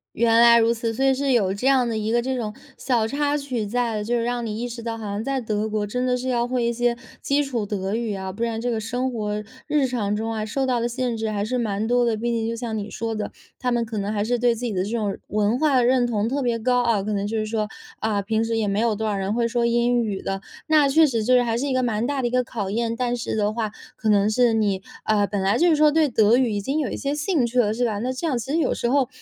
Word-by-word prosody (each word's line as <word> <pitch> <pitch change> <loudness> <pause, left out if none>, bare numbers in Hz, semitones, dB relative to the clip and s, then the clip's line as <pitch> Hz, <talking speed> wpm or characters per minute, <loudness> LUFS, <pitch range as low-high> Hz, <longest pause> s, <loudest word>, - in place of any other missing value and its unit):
原 230 0 +4
来 235 0 +7
如 230 +1 +3
此， 230 0 -2
所 270 +4 0
以 270 - +5
是 275 0 0
有 195 -6 +2
这 250 +7 -2
样 260 -3 +4
的 225 - -2
一 215 +1 -1
个 240 +1 +2
这 260 +1 -2
种 215 -4 -3 0.2
小 235 -4 +1
插 290 +3 0
曲 255 -6 -3
在， 225 -1 -1
就 235 +3 -2
是 230 - 0
让 240 -1 -2
你 215 0 -4
意 245 - -2
识 235 -1 -7
到， 230 -1 -3
好 220 - -7
像 205 +2 -3
在 275 0 -1
德 215 -2 -2
国 210 -1 -1
真 250 +4 -2
的 250 0 +1
是 255 +1 -5
要 240 -1 +1
会 245 -1 -1
一 235 - +1
些 240 0 0 0.2
基 285 +1 +1
础 245 -7 -2
德 195 0 -2
语 230 -3 -2
啊， 190 -1 -5
不 230 +3 -4
然 225 -1 -1
这 245 +1 -2
个 230 - 0
生 245 +4 -2
活 210 -3 -3 0.3
日 295 -3 +2
常 215 -5 -1
中 220 +2 -2
啊， 215 -1 -2
受 265 +5 -1
到 245 -2 +1
的 235 - 0
限 245 -1 -2
制 220 0 -2
还 205 -1 -1
是 250 +3 -1
蛮 215 -2 -1
多 245 0 +3
的， 230 -2 +1
毕 235 +2 -2
竟 230 -1 -1
就 - - -2
像 230 -2 -3
你 210 0 -5
说 225 -1 -3
的， 210 -1 -4 0.3
他 250 -1 -1
们 235 -1 +1
可 220 -1 -6
能 200 +1 -2
还 205 -1 -1
是 240 +3 +1
对 240 0 +3
自 235 +2 -5
己 225 - -2
的 185 0 0
这 200 - -4
种 215 -4 -1
文 210 +3 +1
化 280 -3 +3
认 245 0 +3
同 220 -2 0
特 280 +3 -1
别 235 -3 0
高 245 +2 +2
啊， 225 -4 +2
可 215 +2 -3
能 200 0 -1
就 220 +2 -2
是 215 - -1
说， 215 -1 -2 0.3
啊， 210 -2 0
平 220 +2 0
时 225 0 -1
也 215 -2 0
没 200 +2 0
有 230 -2 +2
多 220 +1 -2
少 210 - 0
人 195 +1 -1
会 235 0 +1
说 235 0 0
英 240 +1 +2
语 205 -3 -3
的。 195 0 -3 0.3
那 300 -3 +4
确 315 +3 +5
实 230 -5 -1
就 255 +3 +4
是 250 - +5
还 230 -1 0
是 280 +4 -1
一 265 - -1
个 255 - +2
蛮 225 -1 0
大 280 -1 -1
的 240 - 0
一 - - -4
个 250 0 +2
考 210 -5 -4
验。 230 +2 -1
但 245 -1 0
是 235 - -3
的 210 0 +1
话 220 -2 -2 0.2
可 220 - -2
能 205 0 +4
是 240 +1 +3
你， 205 -4 +1 0.2
呃， 210 -1 +3
本 200 -1 -2
来 195 +1 +2
就 350 - +4
是 320 - +4
说 305 0 +6
对 305 -1 +3
德 220 -1 +4
语 245 -3 +2
已 205 - -1
经 275 +9 -1
有 280 - -2
一 - - -4
些 280 +1 -2
兴 300 -4 +1
趣 245 +1 0
了， 215 -2 +3
是 245 +2 0
吧？ 210 -3 -1
那 250 +3 -1
这 280 +6 -3
样 260 -5 0
其 265 +4 -5
实 320 - +1
有 330 - +1
时 235 - -1
候 270 -1 +2
235 Hz, 330 characters per minute, -23 LUFS, 215-250 Hz, 0.3 s, 来